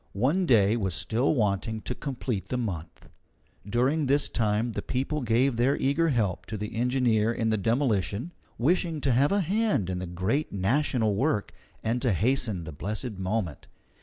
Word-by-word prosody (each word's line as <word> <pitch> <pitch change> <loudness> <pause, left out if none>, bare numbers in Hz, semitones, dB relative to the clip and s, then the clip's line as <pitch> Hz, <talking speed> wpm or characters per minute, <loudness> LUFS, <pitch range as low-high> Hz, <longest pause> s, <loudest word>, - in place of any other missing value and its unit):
One 155 - +2
day 110 -4 +4
was 95 -6 -1
still 120 +10 +1
wanting 110 -1 0
to 125 - -4
complete 125 -7 -4
the 125 - -2
month. 90 -9 -5 0.6
During 135 +6 +1
this 140 +2 +2
time 110 +1 0
the - - -3
people 140 +4 -2
gave 120 +1 +2
their 130 +4 +2
eager 150 +5 +2
help 100 - 0
to 110 - -4
the 105 +1 -5
engineer 120 -2 +2
in 115 -1 0
the 110 - +2
demolition, 115 - 0 0.3
wishing 165 +4 +1
to 135 - +1
have 135 +4 +3
a 200 0 +3
hand 190 - 0
in 90 - -3
the 90 - -5
great 95 - -1
national 110 +2 +1
work 110 0 0 0.3
and 115 +2 0
to 125 -6 +2
hasten 110 - 0
the 80 - -7
blessed 105 - -4
moment. 95 -4 -2
115 Hz, 170 wpm, -27 LUFS, 105-135 Hz, 0.6 s, day